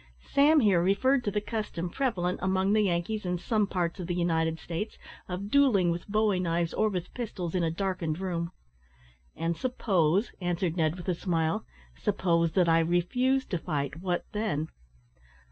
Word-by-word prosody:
Sam 295 Hz, +2 st, +5 dB
here 195 Hz, -6 st, +4 dB
referred 245 Hz, +9 st, +2 dB
to -, -, +2 dB
the 210 Hz, -, 0 dB
custom 210 Hz, -5 st, -3 dB
prevalent 180 Hz, -5 st, -1 dB
among 190 Hz, +2 st, +2 dB
the 215 Hz, -, +4 dB
Yankees 195 Hz, +3 st, 0 dB
in 180 Hz, -1 st, -1 dB
some 210 Hz, +3 st, 0 dB
parts 180 Hz, -1 st, -2 dB
of 175 Hz, -, -4 dB
the 175 Hz, -, -1 dB
United 160 Hz, -2 st, +1 dB
States 175 Hz, +6 st, -5 dB, 0.3 s
of 195 Hz, +3 st, -4 dB
duelling 230 Hz, -12 st, +4 dB
with 170 Hz, +1 st, -4 dB
bowie 210 Hz, -2 st, +2 dB
knives 170 Hz, -1 st, 0 dB
or 215 Hz, -, +2 dB
with 180 Hz, -3 st, -4 dB
pistols 195 Hz, -8 st, -4 dB
in 185 Hz, -, +1 dB
a 165 Hz, -, +2 dB
darkened 165 Hz, -2 st, -2 dB
room. 175 Hz, -2 st, -3 dB, 0.8 s
"And 165 Hz, +1 st, -1 dB
suppose," 195 Hz, -3 st, +1 dB
answered 175 Hz, -1 st, -1 dB
Ned, 160 Hz, -2 st, +1 dB
with 180 Hz, 0 st, -9 dB
a 180 Hz, -, +2 dB
smile 165 Hz, -2 st, -1 dB, 0.3 s
"suppose 170 Hz, -, +1 dB
that 180 Hz, -3 st, +3 dB
I 165 Hz, 0 st, +5 dB
refused 245 Hz, +11 st, +1 dB
to 175 Hz, -, 0 dB
fight, 145 Hz, -2 st, -3 dB
what 180 Hz, -2 st, -1 dB
then?" 210 Hz, -8 st, -2 dB
180 Hz, 170 wpm, -28 LUFS, 170-210 Hz, 0.8 s, Sam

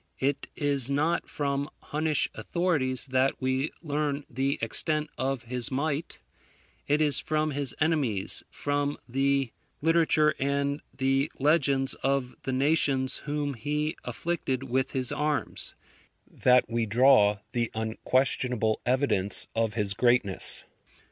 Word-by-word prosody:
It 135 Hz, +1 st, -1 dB
is 140 Hz, -3 st, +2 dB
not 155 Hz, +5 st, 0 dB
from 140 Hz, 0 st, -2 dB
Hunnish 155 Hz, 0 st, 0 dB
authorities 150 Hz, -8 st, 0 dB
that 130 Hz, 0 st, 0 dB
we 130 Hz, +2 st, -1 dB
learn 145 Hz, -2 st, -2 dB
the 135 Hz, +3 st, -1 dB
extent 150 Hz, +7 st, +1 dB
of 135 Hz, -1 st, -2 dB
his 125 Hz, 0 st, -2 dB
might: 145 Hz, +3 st, -3 dB, 0.7 s
It 150 Hz, +2 st, +2 dB
is 150 Hz, -2 st, +2 dB
from 155 Hz, 0 st, -1 dB
his 140 Hz, -2 st, -1 dB
enemies, 140 Hz, -, 0 dB
from 145 Hz, 0 st, -2 dB
the 135 Hz, 0 st, 0 dB, 0.3 s
literature 160 Hz, -1 st, +3 dB
and 140 Hz, +1 st, -1 dB
the 135 Hz, +2 st, 0 dB
legends 140 Hz, -2 st, +2 dB
of 135 Hz, -2 st, -1 dB
the 135 Hz, -, -4 dB
nations 135 Hz, -1 st, +2 dB
whom 145 Hz, -1 st, -2 dB
he 150 Hz, +5 st, -2 dB
afflicted 145 Hz, -6 st, -3 dB
with 130 Hz, 0 st, -1 dB
his 130 Hz, -2 st, +1 dB
arms, 150 Hz, 0 st, -2 dB, 0.5 s
that 125 Hz, 0 st, +3 dB
we 115 Hz, -1 st, -1 dB
draw 115 Hz, -2 st, +4 dB
the 120 Hz, -2 st, -1 dB
unquestionable 110 Hz, 0 st, 0 dB
evidence 125 Hz, -7 st, +4 dB
of 115 Hz, -2 st, -1 dB
his 105 Hz, -3 st, +1 dB
greatness. 120 Hz, -4 st, +2 dB
135 Hz, 120 wpm, -27 LUFS, 125-150 Hz, 0.7 s, draw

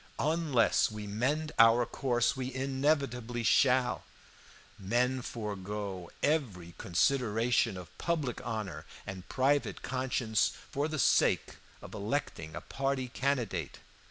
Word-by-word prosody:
Unless 155 Hz, -6 st, +2 dB
we 105 Hz, -1 st, -6 dB
mend 135 Hz, +10 st, -1 dB
our 115 Hz, +1 st, +7 dB
course 120 Hz, -1 st, 0 dB
we 130 Hz, 0 st, -3 dB
inevitably 135 Hz, -3 st, 0 dB
shall. 125 Hz, 0 st, +3 dB, 0.8 s
Men 125 Hz, +6 st, +1 dB
forego 100 Hz, -5 st, -5 dB
every 105 Hz, -, 0 dB
consideration 115 Hz, +1 st, +2 dB
of 90 Hz, -3 st, -10 dB
public 155 Hz, -8 st, -1 dB
honor 110 Hz, -5 st, -4 dB, 0.2 s
and 95 Hz, -1 st, -8 dB
private 140 Hz, +2 st, +1 dB
conscience 125 Hz, -4 st, 0 dB, 0.2 s
for 145 Hz, +2 st, 0 dB
the 155 Hz, 0 st, -3 dB
sake -, -, +3 dB, 0.3 s
of -, -, -10 dB
electing 105 Hz, -, -3 dB
a -, -, -5 dB
party 135 Hz, -2 st, -2 dB
candidate. 120 Hz, -, -1 dB
125 Hz, 110 wpm, -31 LUFS, 105-135 Hz, 0.8 s, our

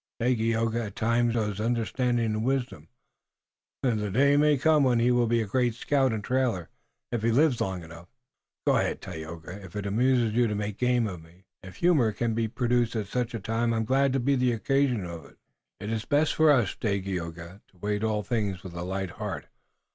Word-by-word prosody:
"Dagaeoga, 115 Hz, -1 st, +1 dB
at 100 Hz, -, -11 dB
times, 115 Hz, +1 st, +1 dB
shows 105 Hz, -3 st, -1 dB
understanding 120 Hz, +1 st, 0 dB
and 110 Hz, 0 st, -1 dB
wisdom. 125 Hz, -, -2 dB, 1.0 s
The 110 Hz, -5 st, 0 dB
day 140 Hz, +8 st, +4 dB
may 150 Hz, 0 st, +4 dB
come 155 Hz, +1 st, +4 dB
when 125 Hz, -3 st, +3 dB
he 120 Hz, +2 st, +3 dB
will 120 Hz, -1 st, +3 dB
be 115 Hz, 0 st, +2 dB
a -, -, -4 dB
great 120 Hz, +2 st, 0 dB
scout 135 Hz, +1 st, +1 dB
and 110 Hz, -2 st, -3 dB
trailer 125 Hz, -9 st, 0 dB, 0.4 s
if 120 Hz, -2 st, -1 dB
he 115 Hz, -, +1 dB
lives 130 Hz, +1 st, +3 dB
long 95 Hz, -2 st, -2 dB
enough." 85 Hz, +1 st, -12 dB, 0.6 s
"Go -, -, +4 dB
ahead, -, -, 0 dB
Tayoga, 85 Hz, +2 st, -8 dB
if 95 Hz, -1 st, -12 dB
it 105 Hz, -1 st, -3 dB
amuses 120 Hz, +2 st, +2 dB
you 120 Hz, +1 st, +3 dB
to 105 Hz, -, -2 dB
make 105 Hz, 0 st, -4 dB
game 125 Hz, -1 st, +2 dB
of 90 Hz, -6 st, -5 dB
me. 85 Hz, +4 st, -20 dB, 0.2 s
If 95 Hz, -1 st, -11 dB
humor 145 Hz, -, +3 dB
can 115 Hz, +2 st, -1 dB
be 115 Hz, 0 st, 0 dB
produced 120 Hz, 0 st, 0 dB
at 110 Hz, -2 st, -1 dB
such 120 Hz, 0 st, -2 dB
a -, -, -3 dB
time 115 Hz, +3 st, 0 dB
I'm 115 Hz, 0 st, 0 dB
glad 135 Hz, +3 st, +2 dB
to 135 Hz, -, +1 dB
be 135 Hz, +3 st, +1 dB
the 125 Hz, -1 st, +2 dB
occasion 125 Hz, -2 st, +1 dB
of 85 Hz, -2 st, -7 dB
it." -, -, -18 dB, 0.4 s
"It's 110 Hz, +3 st, -3 dB
best 150 Hz, +2 st, +2 dB
for 160 Hz, 0 st, +4 dB
us, 120 Hz, -9 st, +3 dB
Dagaeoga, 95 Hz, -3 st, -4 dB
to -, -, -31 dB
await 105 Hz, +3 st, -2 dB
all 105 Hz, -1 st, 0 dB
things 100 Hz, -4 st, -2 dB
with 95 Hz, -3 st, -8 dB
a 85 Hz, -, -5 dB
light 95 Hz, 0 st, -3 dB
heart. 105 Hz, 0 st, -5 dB
115 Hz, 200 wpm, -27 LUFS, 100-125 Hz, 1.0 s, day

